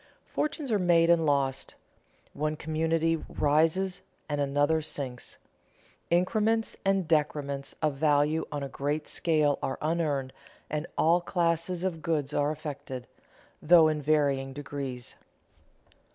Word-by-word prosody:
Fortunes 300 -3 -2
are 210 - +3
made 170 -2 +4
and 165 -2 +3
lost. 135 -2 0 0.6
One 155 +1 -1
community 165 +1 0
rises 160 +6 +1 0.3
and 145 -1 -1
another 145 +3 +2
sinks. 130 -5 -5 0.7
Increments 215 +6 +1
and 195 -3 +1
decrements 145 -3 -1
of 150 -3 +1
value 150 +1 +2
on 145 -1 -3
a - - -3
great 145 +3 -3
scale 155 -4 +1
are 130 - -2
unearned, 150 -5 -1 0.4
and 150 +2 -2
all 170 +2 +4
classes 170 0 0
of 175 -4 -2
goods 150 -3 -1
are 145 0 +1
affected, 145 -5 -6 0.6
though 160 0 +7
in 155 -1 -1
varying 140 -3 +1
degrees. 135 -3 -6
155 Hz, 125 wpm, -28 LUFS, 145-170 Hz, 0.7 s, though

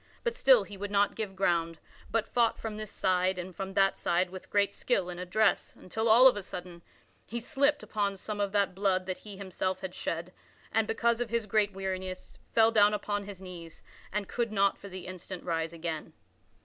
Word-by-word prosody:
But 475 -1 0
still - - +6
he 205 - -10
would 205 +1 -4
not 205 0 +3
give 210 -4 -5
ground, 170 -3 +1 0.3
but 225 -1 0
fought 235 -2 +2
from 220 -2 -5
this 215 -1 -6
side 185 -1 +1
and 180 0 -6
from 195 -1 -5
that 195 -1 +4
side 175 +1 +1
with 185 -1 -9
great 205 -1 +2
skill 180 -2 0
and 175 - -7
address 195 +4 +1
until 220 +5 -2
of 245 +2 +8
a 205 - -3
sudden, 180 -2 -7 0.5
he 235 - -3
slipped 280 +5 +1
upon 200 -2 -1
some 210 +2 -5
of 200 -1 0
that 200 -2 +2
blood 190 -1 +1
that 185 0 -4
he 205 -2 -10
himself 185 -1 -3
had 190 -2 -5
shed, 170 +2 -4 0.4
and 220 -1 +2
because 235 +1 +1
of 240 - -2
his 230 -1 0
great 210 -1 +2
weariness, 185 -1 -5
fell 225 0 +5
down 210 -1 +5
upon 205 -1 -2
his 200 -2 -8
knees, 175 -3 -10 0.3
and 205 -1 -2
could 235 -2 -1
not 200 -1 +3
for 200 - -11
the 185 -1 -8
instant 185 0 -7
rise 165 -1 -1
again. 165 -2 -5
195 Hz, 200 wpm, -30 LUFS, 185-215 Hz, 0.5 s, of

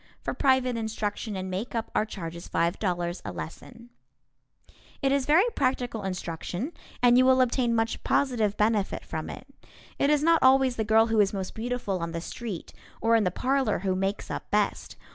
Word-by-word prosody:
For - - -2
private 260 -2 +2
instruction 220 -1 -3
in 190 0 -4
makeup 225 +4 -3
our 215 - +1
charge 170 -6 -6
is 170 - -9
$5.00 175 +1 -1
a - - -5
lesson. 235 +8 -9 1.1
It 270 - +1
is 275 -1 +1
very 325 +8 +5
practical 250 -4 -1
instruction 185 - -4 0.3
and 245 0 +6
you 255 - +5
will 260 0 +5
obtain 245 -1 +2
much 225 0 -1
positive 225 -7 +1
benefit 210 -2 0
from - - -5
it. - - -8 0.5
It 280 - +3
is 300 -1 +3
not 330 0 +4
always 260 -1 +5
the 220 - -1
girl 220 +1 +4
who 225 -1 +1
is 200 -1 +3
most 190 -2 -4
beautiful 230 -4 -3
on 170 0 -4
the 165 - -2
street 210 0 -6 0.3
or 230 +1 +3
in 220 -3 +3
the - - +3
parlor 260 +3 0
who 190 - +2
makes 195 +2 -2
up - - -5
best. - - 0
225 Hz, 180 wpm, -27 LUFS, 195-255 Hz, 1.1 s, and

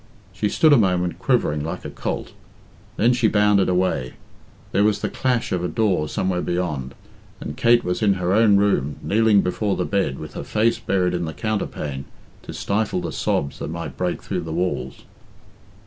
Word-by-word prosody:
She 105 +2 -1
stood 155 +6 +4
a - - +7
moment 90 -5 +1
quivering 75 0 +1
like 80 - -5
a - - -5
colt, - - -4 0.6
then 120 +3 +4
she 120 -2 +2
bounded 105 -2 +3
away; 90 -8 0 0.6
there 100 - +2
was 105 -1 +2
the - - -2
clash 125 -3 0
of 90 -1 -1
a - - 0
door 95 -8 0
somewhere 90 -1 -1
beyond, 75 -7 -3 0.4
and 75 - -6
Kate 120 0 +4
was 90 +3 -2
in 105 -2 +4
her 90 0 0
own 105 -1 +5
room, 75 -9 +1
kneeling 110 -1 +4
before 100 +2 -1
the - - -1
bed 95 -10 0
with 75 -1 -8
her - - -5
face 115 +1 +1
buried 95 -5 0
in 90 -1 -1
the 80 - -5
counterpane 75 -9 -3 0.4
to - - -9
stifle 100 -1 -1
the - - -4
sobs 70 - -1
that - - -4
might 85 +1 -6
break 90 -1 -2
through - - -3
the 80 - -6
walls. 80 -6 -3
95 Hz, 185 wpm, -22 LUFS, 85-105 Hz, 0.6 s, a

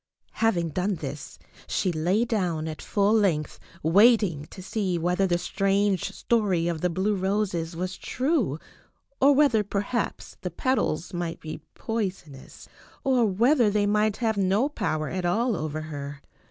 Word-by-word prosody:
Having 175 -7 +2
done 185 +5 -1
this 150 -2 -7 0.3
she 185 - 0
lay 180 +8 +1
down 180 -9 -1
at 155 -1 -6
full 205 0 +1
length 185 -9 +1 0.2
waiting 195 -3 +4
to 185 - -11
see 190 -3 -1
whether 180 +3 +1
the 175 -1 +2
strange 195 +1 0
story 195 -8 +1
of 165 -2 -2
the 180 - +1
blue 190 +5 0
roses 190 -4 -1
was 185 +2 -4
true, 255 - 0 0.6
or 280 +2 +7
whether 265 -7 +4
perhaps 205 +4 -3
the - - -3
petals 195 - -1
might 175 -1 -3
be 155 0 -7
poisonous, 190 -11 -5 0.4
or 255 -3 +3
whether 235 +4 +3
they 205 0 +1
might 210 0 +2
have 220 -3 0
no 200 +6 +2
power 155 - -2
at 185 -1 -3
all 225 +7 +1
over 155 -1 -3
her. 145 -2 -6
190 Hz, 150 wpm, -26 LUFS, 165-215 Hz, 0.6 s, or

